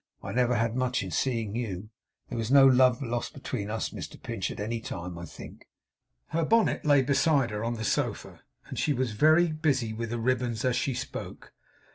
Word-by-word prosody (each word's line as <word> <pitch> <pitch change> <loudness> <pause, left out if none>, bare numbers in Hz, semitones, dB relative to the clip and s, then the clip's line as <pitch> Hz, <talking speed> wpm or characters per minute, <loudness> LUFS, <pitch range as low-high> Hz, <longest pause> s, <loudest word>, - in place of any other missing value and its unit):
I - - -5
never 125 0 +2
had 115 +1 0
much 125 -2 0
in 95 - -6
seeing 115 -4 -1
you. 105 -3 -4 0.4
There 120 - -4
was 110 0 -2
no 135 0 +7
love 130 0 +5
lost 120 -1 -3
between 105 -6 -4
us, 110 +1 -2
Mr - - -8
Pinch, - - -3
at - - -7
any 115 +3 -2
time, 90 -4 -6
I 85 0 -7
think.' - - -12 0.6
Her 165 +1 0
bonnet 225 +7 +2
lay 145 -3 +5
beside 140 -2 +2
her 105 +1 -3
on 120 +1 -1
the 110 - -5
sofa, - - -2 0.2
and - - -6
she 150 - +2
was 130 -3 -1
very 155 +9 +4
busy 140 -8 0
with 115 +1 -4
the 120 - -2
ribbons 120 0 0
as 125 -1 +2
she 135 - 0
spoke. - - -7
120 Hz, 200 wpm, -28 LUFS, 110-135 Hz, 0.6 s, no